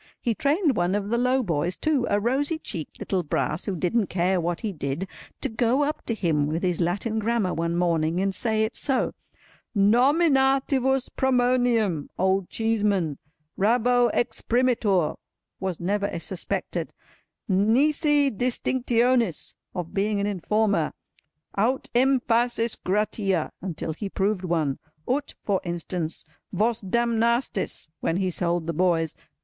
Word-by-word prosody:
He 235 - 0
trained 290 - +1
one 175 +1 +1
of 205 0 -2
the 235 - +1
low 255 +1 +2
boys, 170 -2 -1
too, 295 -6 +1
a 205 - +2
rosy 275 +8 +1
cheeked 165 - -7
little 190 -2 -1
Brass 155 0 -2
who 195 - -2
didn't 190 +5 +1
care 180 0 +1
what 170 0 -2
he 215 -3 -3
did, 145 +4 -3 0.3
to - - +1
go 240 +4 +1
up 300 +2 -2
to 230 - 0
him 155 -8 +1
with 160 +4 -2
his 180 -1 0
Latin 200 +6 -1
Grammar 220 -3 0
one 170 +1 -1
morning, 170 -1 +1
and 195 0 0
say 220 +2 0
it 220 +2 -2
so: 270 -2 0 0.6
Nominativus 265 +2 +3
pronominum—Old 230 - +1
Cheeseman, 205 -9 0 0.4
raro 245 +4 +3
exprimitur—was 205 -7 -1
never 200 +1 -1
suspected, 175 +2 -3 0.5
nisi 280 - +3
distinctionis—of 235 - 0
being 205 +1 0
an 200 - 0
informer, 205 -3 0 0.6
aut 240 +6 0
emphasis 240 -2 +2
gratîa—until 190 -4 -2
he 195 +5 -5
proved 195 -1 -1
one. 160 -6 0 0.3
Ut—for 250 -7 -1
instance, 170 -1 -2 0.3
Vos 225 +2 +1
damnastis—when 230 -6 0
he 185 -1 0
sold 170 -1 0
the 170 - -2
boys. 165 -2 +1
210 Hz, 120 wpm, -25 LUFS, 175-245 Hz, 0.6 s, Nominativus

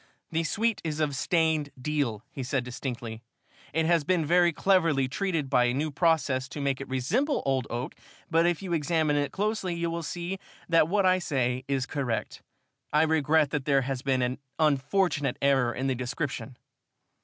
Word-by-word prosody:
"The 165 0 0
suite 215 +8 0
is 155 -2 -3
of 150 -3 0
stained 160 0 +1
deal," 125 -6 -1
he 135 - -6
said 130 0 -1
distinctly. 120 -2 -5 0.5
"It 160 0 +1
has 170 -2 +3
been 175 -1 +1
very 175 +2 +4
cleverly 165 -7 +2
treated 165 0 -1
by 125 -2 +3
a 120 +1 +1
new 150 +3 -1
process 145 -4 +1
to - - -7
make 140 -1 -1
it - - -6
resemble 215 - 0
old 135 -3 0
oak, 120 +2 -4 0.3
but 165 +1 +3
if 175 +2 0
you 180 -3 -3
examine 155 -1 +1
it 145 -1 0
closely 205 -3 -1
you 170 0 -2
will 170 0 -3
see 175 +4 -4 0.3
that 165 -2 +4
what 200 +2 +2
I 185 0 +4
say 130 -6 -1
is 135 -2 0
correct. 130 -5 -3 0.5
I 150 +1 +4
regret 155 -2 +3
that 145 -3 -2
there 140 -2 +3
has 135 -1 -3
been 130 -2 +1
an 125 +2 -2 0.2
unfortunate 150 -1 +1
error 135 -3 +3
in 130 +2 -3
the 135 - +1
description." 130 +1 -4
150 Hz, 180 wpm, -28 LUFS, 130-170 Hz, 0.5 s, very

